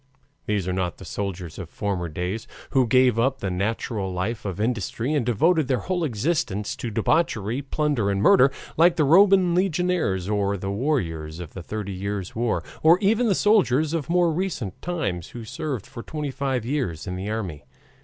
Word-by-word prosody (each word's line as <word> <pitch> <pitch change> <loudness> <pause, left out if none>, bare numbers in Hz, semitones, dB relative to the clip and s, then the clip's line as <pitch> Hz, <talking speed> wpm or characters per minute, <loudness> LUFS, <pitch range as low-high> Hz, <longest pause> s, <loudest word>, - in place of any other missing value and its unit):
These 105 -4 0
are 90 - 0
not 90 -2 -2
the - - -11
soldiers 95 -5 -5
of 90 -4 -7
former 95 -4 -2
days, 90 +7 -4 0.2
who 130 -3 +3
gave 125 -1 +4
up 135 +3 +2
the 95 -6 -3
natural 100 +1 -2
life 100 +6 -3
of 95 -1 -4
industry 115 +4 -1
and 145 -4 +1
devoted 155 - +2
their 130 -2 0
whole 180 -2 -1
existence 120 - -1
to 120 - -4
debauchery, 115 - 0
plunder, 140 -6 0
and 100 -1 0
murder, 125 +6 +6 0.3
like 170 +2 +5
the 155 - +2
Roman 185 +3 +5
legionaries 175 - +1
or 100 -1 0
the 95 +1 -4
warriors 85 - -2
of 85 -3 -8
the 95 - -7
Thirty 100 +3 -5
Years' 100 0 -4
War, 115 0 0 0.2
or 165 +3 +6
even 215 +5 +2
the 200 - +3
soldiers 160 - +3
of 160 -4 -2
more 175 -1 +3
recent 155 - -3
times 160 - -2
who 120 - -8
served 140 - -4
for 115 - -9
twenty 150 +2 -4
five 130 -4 -2
years 120 - -2
in 90 -2 -4
the 95 +3 -4
army. 95 -10 -4
115 Hz, 185 wpm, -24 LUFS, 95-155 Hz, 0.3 s, murder